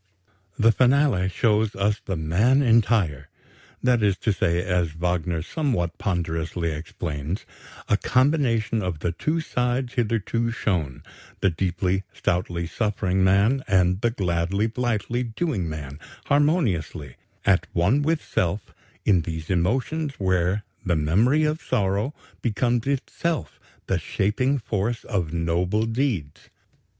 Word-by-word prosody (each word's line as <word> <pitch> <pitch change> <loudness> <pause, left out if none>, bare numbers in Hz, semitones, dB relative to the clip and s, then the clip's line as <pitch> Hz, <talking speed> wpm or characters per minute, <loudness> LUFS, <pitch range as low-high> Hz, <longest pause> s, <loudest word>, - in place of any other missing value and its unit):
The 115 +1 +5
finale 125 -5 +3
shows 105 +2 +1
us 100 +2 0
the 95 - -3
man 100 - +2
entire 110 - +2 0.5
[that 125 -2 +3
is 100 -2 +2
to 110 - +3
say, 85 -1 +1
as 90 -4 0
Wagner 85 -1 -1
somewhat 110 - -1
ponderously 85 -2 -2
explains, 80 +1 -4 0.4
a 105 - +3
combination 120 -4 +2
of 90 -5 -3
the 85 - 0
two 155 - -1
sides 125 -2 -1
hitherto 115 -1 0
shown 85 - -2 0.4
the 95 - +3
"deeply, 90 +2 0
stoutly 85 -1 -1
suffering 95 -1 0
man," 100 +8 +3
and 90 0 +2
the 120 - +3
"gladly, 95 -1 0
blithely 120 0 -1
doing 115 - -2
man"] 75 -2 -7 0.3
harmoniously 125 - +1 0.3
"at 95 -2 +3
one 100 +12 +3
with 160 +1 0
self, 100 -2 -1 0.3
in 95 -5 +4
these 80 +1 -5
emotions 130 - 0
where 95 +1 +1 0.2
the 90 -4 +1
memory 105 - +3
of 155 +1 0
Sorrow 105 +3 0 0.3
becomes 120 +1 0
itself 145 +4 -2 0.3
the - - 0
shaping 125 +8 0
force 110 -1 -2
of 90 -8 -2
noble 85 +6 0
deeds.... 115 - -2
100 Hz, 125 wpm, -24 LUFS, 85-120 Hz, 0.5 s, The